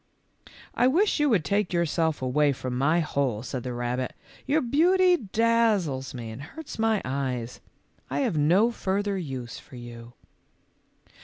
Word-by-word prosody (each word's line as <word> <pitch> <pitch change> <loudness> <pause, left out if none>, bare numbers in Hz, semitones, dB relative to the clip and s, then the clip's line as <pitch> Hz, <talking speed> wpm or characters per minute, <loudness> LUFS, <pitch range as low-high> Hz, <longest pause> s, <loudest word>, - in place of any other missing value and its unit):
" - - -41 0.3
I 245 - +3
wish 350 +7 +2
you 295 -1 +3
would 200 -10 +2
take 200 -2 0
yourself 165 -3 0
away 140 +3 +2
from 130 -1 -5
my 155 +7 +2
hole," 135 -8 -1
said 125 +1 -4
the 125 - -5
rabbit; 120 +1 -2 0.2
" - - -23
your 295 +4 +3
beauty 355 +8 +4
daz 225 - +2
zles 135 -1 -5
me 115 -2 -6
and 110 +5 -8
hurts 250 - -9
my 225 -2 +2
eyes. 130 -3 -3 0.5
I - - -1
have 235 - 0
no 175 +10 +4
further 200 -2 -1
use 130 -9 -5
for - - -15
you." 120 -1 -10
160 Hz, 165 wpm, -26 LUFS, -, 0.5 s, beauty